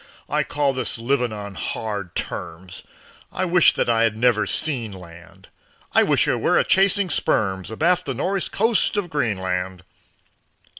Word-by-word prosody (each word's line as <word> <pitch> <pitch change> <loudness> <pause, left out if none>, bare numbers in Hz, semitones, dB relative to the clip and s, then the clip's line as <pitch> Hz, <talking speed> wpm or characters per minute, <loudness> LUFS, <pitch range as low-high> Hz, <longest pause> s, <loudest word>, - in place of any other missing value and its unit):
"I - - +1
call 145 -2 0
this 130 -3 -3
living 125 0 0
on 100 -1 -7
hard 100 -2 -4
terms; 90 +3 -6 0.5
I 185 - -1
wish 175 -1 +5
that - - 0
I 115 -1 +2
had 115 -2 +2
never 115 -2 +2
seen 125 -9 -2
land; 85 -2 -13 0.4
I - - +5
wish - - +2
I - - +2
were - - +2
a - - +4
chasing 195 -1 +2
sperms 95 -8 0
Abaft 170 +10 +1
the 135 - -2
nor'east 190 +8 -2
coast 220 0 +1
of 180 -5 -2
Greenland." 95 -8 -2
115 Hz, 155 wpm, -22 LUFS, 95-160 Hz, 0.5 s, wish